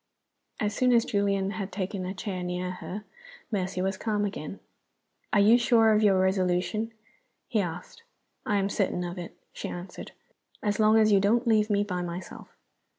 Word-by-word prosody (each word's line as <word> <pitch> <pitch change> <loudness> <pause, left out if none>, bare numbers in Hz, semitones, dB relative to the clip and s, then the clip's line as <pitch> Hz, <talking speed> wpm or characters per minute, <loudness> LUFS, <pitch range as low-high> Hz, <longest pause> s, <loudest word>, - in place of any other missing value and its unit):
As 210 -1 0
soon 250 -1 +3
as 230 -1 +4
Julian 200 -1 0
had 200 -2 -5
taken 190 -1 -3
a 190 - -5
chair 190 -1 -4
near 180 0 -3
her, 185 +3 -7 0.5
Mercy 185 -2 -1
was 190 0 -1
calm 210 -2 0
again. 195 -2 -5 0.7
"Are 210 - +4
you 220 +4 +6
sure 225 -2 +4
of 210 - +3
your 195 -3 +4
resolution?" 190 +4 +1 0.6
he 220 -4 +1
asked. 180 - -6 0.4
"I 210 - 0
am 195 -1 +2
certain 195 -3 -1
of 175 +1 -5
it," 175 - -8 0.2
she - - -5
answered, 175 +2 -8 0.5
"as 205 0 0
long 215 0 +5
as 215 -1 +5
you 200 - +6
don't 225 +5 +2
leave 215 -2 +3
me 205 -1 +2
by 180 -3 -3
myself." 175 +1 -7
200 Hz, 175 wpm, -28 LUFS, 185-215 Hz, 0.7 s, you